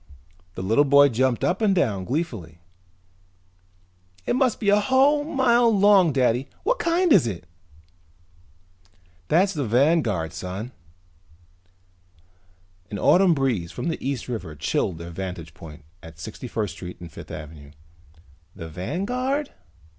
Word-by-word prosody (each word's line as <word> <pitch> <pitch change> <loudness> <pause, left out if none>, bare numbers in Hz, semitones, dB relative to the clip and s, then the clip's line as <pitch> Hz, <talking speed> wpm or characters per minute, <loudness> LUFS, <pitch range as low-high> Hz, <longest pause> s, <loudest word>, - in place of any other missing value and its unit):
The - - -5
little 110 +9 +3
boy 140 0 +6
jumped 125 0 0
up 185 +5 0
and 205 -3 +3
down 105 - 0
gleefully. 120 - -4 1.7
"It - - 0
must 255 -3 +1
be 205 - 0
a 205 +1 +5
whole 270 +6 +3
mile 245 -5 +3
long, 200 -5 +5
Daddy! 130 -1 +1
What - - 0
kind 340 -1 +2
is 155 -11 +4
it?" 90 -7 -6 1.8
"That's 190 +5 +2
the 150 -4 -2
Vanguard, 120 - +1
son." 95 +7 -6 2.2
An 105 - -5
autumn 180 - +4
breeze 120 - -1
from 170 - -4
the 165 - -4
East 135 -3 -3
River 110 -11 -5
chilled 80 +4 -1
their 85 +1 -8
vantage 85 -3 -7
point 75 -2 -13 0.2
at 80 -1 -13
Sixty 110 +8 -8
First 105 -5 -3
Street 90 -1 -9
and 85 -2 -10
Fifth - - -11
Avenue. 75 -1 -9 0.9
"The 80 - -8
Vanguard?" 245 - -3
130 Hz, 130 wpm, -24 LUFS, -, 2.2 s, boy